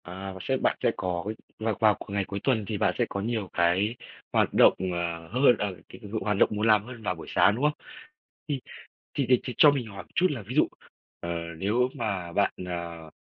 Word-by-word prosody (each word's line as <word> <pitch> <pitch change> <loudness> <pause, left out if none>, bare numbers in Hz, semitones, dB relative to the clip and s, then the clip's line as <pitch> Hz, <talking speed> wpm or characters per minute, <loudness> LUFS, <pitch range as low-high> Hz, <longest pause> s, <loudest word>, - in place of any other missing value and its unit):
À, 95 +2 -7
và 95 - -9
sẽ 130 +6 0
bạn - - +1
sẽ - - +4
có 90 -1 -2 0.3
vào 110 -1 0
vào 110 -1 +5
c - - -11
ngày 100 -1 -1
cuối 100 +1 -5
tuần 115 -6 +1
thì 105 - -2
bạn - - +1
sẽ - - +2
có 100 - -3
nhiều 110 -2 -2
cái 90 +6 +2 0.4
hoạt - - +2
động, - - +7 0.2
ờ, 85 -1 -3
hơn, 125 - +4
ờ, 100 -3 -2
c - - -17
h - - -11 0.2
hoạt 105 -2 0
động - - +5
muốn 105 +2 0
làm 105 -2 +5
hơn 120 -1 -10
vào 90 -3 -1
buổi 80 - -10
sáng, 100 - +4
đúng 125 - -3
không? 150 0 +3 0.7
Thì 140 -4 -2 0.5
thì 140 - 0
thì 125 -2 +6
thì 125 - -4
cho 150 - +8
mình 130 -5 -2
hỏi 100 -2 -8
chút 185 - +4
là 130 -6 -4
ví 110 +6 -7
dụ, 155 - +5 0.5
ờ, 85 - -5 0.3
nếu 115 +8 +1
mà 100 -8 -3
bạn, 100 - +2
ờ, 85 -2 -6
105 Hz, 230 wpm, -27 LUFS, 90-120 Hz, 0.7 s, cho